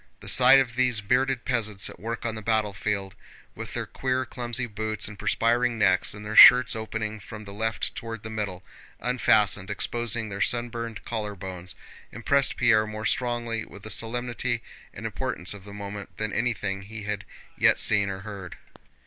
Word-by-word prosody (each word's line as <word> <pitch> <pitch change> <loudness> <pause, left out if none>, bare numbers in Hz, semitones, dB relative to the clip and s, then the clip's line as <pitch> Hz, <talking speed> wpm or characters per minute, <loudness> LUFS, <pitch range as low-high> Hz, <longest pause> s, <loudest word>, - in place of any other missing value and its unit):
The - - -12
sight 130 +2 +7
of 120 -3 -1
these 125 -3 +2
bearded 125 +4 0
peasants 110 -5 0
at - - -11
work 115 +4 -5
on 115 - -1
the 110 - -6
battlefield, 105 -2 -1 0.4
with - - -8
their - - -2
queer, 130 0 -2
clumsy 120 0 -3
boots 110 -1 -3
and 100 -2 -11
perspiring 115 +3 +1
necks, 95 -1 +2
and 105 0 -9
their 110 +1 -4
shirts 125 -1 +9
opening 110 -1 -4
from 105 +1 -10
the 100 -1 -10
left 110 +2 -2
toward 115 -1 -7
the 110 - -7
middle, 100 -4 -4 0.4
unfastened, 105 -5 +2
exposing 115 +1 0
their 100 0 -5
sunburned 115 -2 -1
collarbones, 95 -5 -4 0.4
impressed 140 +5 +1
Pierre 115 -3 +4
more 110 0 -6
strongly 120 -2 -1
with 100 +3 -13
the 110 - -5
solemnity 120 +1 -1 0.3
and - - -9
importance 90 +3 -3
of 100 -1 -12
the 100 - -10
moment 100 0 -8
than 110 -2 -3
anything 105 -5 -1
he 105 +2 -9
had 105 -1 -3 0.3
yet - - +4
seen 100 -1 +4
or 95 0 -5
heard. 100 -3 -8
110 Hz, 170 wpm, -26 LUFS, 100-120 Hz, 0.4 s, shirts